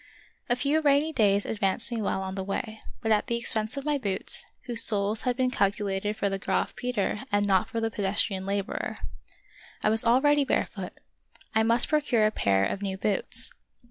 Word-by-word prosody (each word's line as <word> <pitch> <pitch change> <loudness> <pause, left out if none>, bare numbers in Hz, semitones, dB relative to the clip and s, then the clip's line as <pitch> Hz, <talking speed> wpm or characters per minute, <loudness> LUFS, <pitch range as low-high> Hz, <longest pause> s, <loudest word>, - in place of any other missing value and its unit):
A 240 - +3
few 285 +5 +1
rainy 295 +2 +2
days 205 -5 +2
advanced 200 +2 +1
me 230 -2 -2
well 190 -1 -1
on 190 0 -5
the 190 0 -4
way, 215 +3 -4 0.2
but 225 - 0
at 210 -1 +2
the 235 - 0
expense 220 +1 -2
of 275 - -5
my 295 -1 0
boots, 200 -6 -1 0.2
whose 235 -2 -1
soles 210 0 +1
had 250 -1 -1
been 255 -1 +1
calculated 200 -1 -1
for 200 - 0
the 195 0 -2
Graf - - -1
Peter 235 -4 -2
and 205 0 +2
not 190 -2 +2
for 230 - -3
the 225 0 -1
pedestrian 195 -1 -1
laborer. 200 0 -3 0.9
I - - +3
was 225 0 +2
al 235 +2 +4
ready 290 +1 +3
barefoot; 270 - -2 0.6
I 220 - +3
must 230 +2 +3
procure 285 -8 +2
a 215 - +2
pair 100 - +1
of 195 - -3
new 195 -1 -3
boots. 200 0 +3
215 Hz, 195 wpm, -27 LUFS, 200-245 Hz, 0.9 s, al